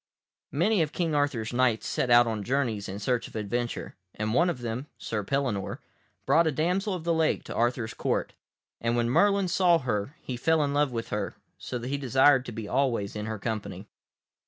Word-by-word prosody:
Many 180 +6 +2
of 155 -2 -1
King 165 -3 -1
Arthur's 145 -6 0
Knights 120 -3 +2
set 125 - -1
out 120 0 +7
on 110 -3 -2
journeys 120 -5 -1
in 95 - -5
search 120 +3 -1
of - - -15
adventure, 120 +3 -3 0.2
and 110 +1 -2
one 170 +7 +4
of 155 -8 -3
them, 120 +4 -4
Sir 105 -2 -3
Pellinore, 125 -5 -1 0.5
brought 165 +1 +4
a - - +2
damsel 180 +7 0
of 175 - -6
the 170 0 +1
lake 160 -1 +1
to - - -7
Arthur's 120 -1 0
Court, - - -1 0.5
and 115 +1 0
when 120 0 +1
Merlin 200 +5 +3
saw 175 -1 +4
her 125 -1 -2
he 125 - -4
fell 160 +4 +2
in 140 -1 -1
love 145 -1 +2
with 115 -1 -4
her, 105 -1 -3 0.2
so 125 - -4
that 120 +1 -5
he 140 +1 -1
desired 130 0 +4
to - - -5
be 110 -1 -6
always 120 -6 0
in 105 +1 -4
her 110 -1 -3
company. 110 0 -4
125 Hz, 205 wpm, -28 LUFS, 115-150 Hz, 0.5 s, out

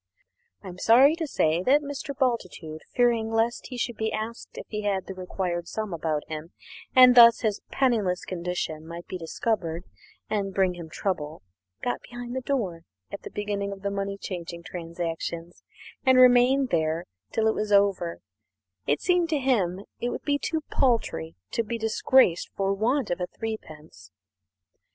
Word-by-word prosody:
I - - -9
am 180 0 -9
sorry 265 +9 +6
to 325 -2 -2
say 160 - +1
that 280 +9 +4
Mr. 280 -1 -6
Bultitude, 185 - -2
fearing 235 -3 +3
lest 225 +1 0
he 250 - -7
should 240 -1 -2
be 220 0 -1
asked 220 +2 -5
if - - -6
he 210 -1 -3
had 200 -2 -1
the 195 - -6
required 180 -2 -3
sum 215 -4 -4
about 155 -2 -2
him, 155 +1 -7 0.4
and 255 -1 +9
thus 235 -1 +8
his 215 -3 -1
penniless 215 -9 +1
condition 170 -3 -4
might 170 +1 -8
be 185 - -6
discovered 170 -1 -2 0.4
and 200 -3 -2
bring 190 -2 +3
him 170 -2 -9
trouble, 155 - -3 0.4
got 245 - -1
behind 245 0 -8
the 260 - -1
door 220 -11 -2 0.3
at 200 - -6
the - - -8
beginning 205 -1 -3
of 195 0 -9
the 200 - -1
money 200 0 -3
changing 170 -3 -6
transactions 170 0 -5 0.4
and 260 -1 +5
remained 255 +1 +6
there 160 0 0 0.3
till 220 - 0
it 220 - +3
was 210 0 -3
over 200 -4 +2 0.7
it 145 - +1
seemed 355 -2 +2
to 310 - +1
him 235 -10 +1
that 195 - -10
it 240 - -1
would - - -5
be 285 -1 +1
too 320 +1 -2
paltry 85 - 0 0.2
to - - +1
be 230 +2 -3
disgraced 225 -3 +3
for 195 0 +1
want 235 +4 0
of 175 - -2 0.2
threepence. 155 - -7
200 Hz, 170 wpm, -26 LUFS, 175-245 Hz, 0.7 s, and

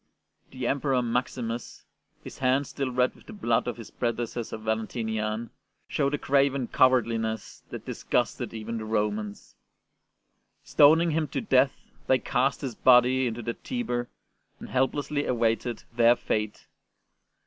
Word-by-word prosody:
The 130 -1 -6
Emperor 135 -1 +1
Maximus, 120 -1 -3 0.4
his - - -10
hands 130 +1 +2
still 135 -2 -2
red 125 0 +1
with - - -21
the 225 - -9
blood 120 - 0
of 120 - -3
his 115 - -10
prede 120 -2 -1
cessor 115 -1 -5
Valentinian, 110 0 -2 0.4
showed 140 0 0
a - - -3
craven 140 -2 +1
cowardli 125 -3 +3
ness 110 -1 -4
that - - -8
disgusted - - -1
even 115 +1 -5
the 110 - -5
Romans. 105 -1 -2 1.1
Ston 155 +3 +6
ing 170 -1 +1
him 155 0 0
to - - -3
death, 135 - +1 0.2
they 130 - +5
cast 130 +2 0
his 135 -4 -3
body 125 +2 +5
into 120 0 -4
the 115 +1 -2
Tiber 120 - -3 0.5
and - - -9
helplessly 145 +2 0
awaited 115 -1 0
their 120 0 +6
fate. 105 -3 -3
125 Hz, 145 wpm, -27 LUFS, 115-135 Hz, 1.1 s, Ston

